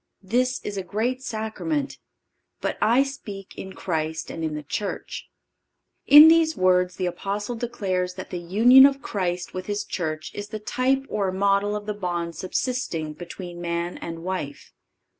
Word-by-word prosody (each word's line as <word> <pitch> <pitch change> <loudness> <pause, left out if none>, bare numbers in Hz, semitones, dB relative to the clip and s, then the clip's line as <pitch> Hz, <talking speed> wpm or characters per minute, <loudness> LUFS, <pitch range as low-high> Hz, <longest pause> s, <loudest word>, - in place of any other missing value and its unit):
This 250 +6 +1
is 205 -1 -4
a 190 - -2
great 235 +7 -2
sacrament: 260 +6 -3 0.6
but - - -2
I 240 +5 +4
speak 210 -8 -8
in 190 0 -8
Christ 160 -2 -3
and 165 - -5
in 155 -1 -2
the 150 - -5
Church."(536) 200 +8 -5 0.8
In 300 +2 +12
these 325 -1 +4
words 180 0 +3
the 185 - -2
Apostle 200 +5 -3
declares 190 -6 -2
that 185 - -8
the 180 - -3
union 235 +10 +7
of 275 -2 -4
Christ 180 -3 -2
with 185 0 -5
His 205 0 -2
Church 155 -3 -4
is 205 0 -6
the 215 - -5
type 260 +5 0
or 195 -3 -1
model 200 +2 +1
of 210 0 -5
the 210 - -2
bond 175 -4 -3
subsisting 185 - -2
between 175 +1 -8
man 170 0 -3
and 165 0 -7
wife. 175 -6 -5
195 Hz, 160 wpm, -24 LUFS, 175-235 Hz, 0.8 s, In